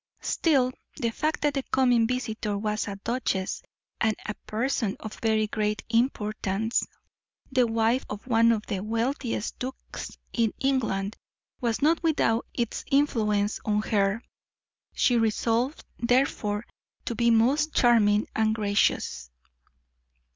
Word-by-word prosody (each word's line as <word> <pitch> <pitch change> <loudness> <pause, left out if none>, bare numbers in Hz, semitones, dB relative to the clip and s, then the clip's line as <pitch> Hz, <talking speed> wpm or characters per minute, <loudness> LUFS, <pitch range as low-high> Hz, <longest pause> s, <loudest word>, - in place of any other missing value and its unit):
'" - - -39
Still, 270 -6 +2 0.3
the 230 -1 0
fact 310 +7 -1
that 295 -1 +2
the 275 - 0
coming 245 -4 +3
visitor 225 -4 -2
was 210 +1 -1
a 200 - -4
duchess, 200 -3 -2 0.4
and 220 -2 +2
a 210 - -2
person 220 -1 -1
of 215 - -8
very 220 -1 +2
great 210 0 -1
importance, 220 -3 0 0.6
the 255 -2 +3
wife 225 +3 +1
of 210 0 -6
one 230 -2 +4
of 215 -2 -1
the 200 - -2
wealthiest 230 +2 -2
dukes 260 +1 -7 0.2
in 230 -3 +1
England, 220 -7 0 0.4
was 235 +1 -1
not 325 +2 +3
without 290 -8 +1
its 235 -2 -2
influence 215 -7 +2
on 210 0 +1
her; 205 +1 +1 0.7
she 245 - +3
resolved, 230 +5 0
therefore, 235 -4 +1 0.4
to - - -2
be 235 0 +2
most 265 +7 +3
charming 215 -4 +4
and 220 0 +2
gracious. 200 - 0
225 Hz, 130 wpm, -27 LUFS, 210-250 Hz, 0.7 s, one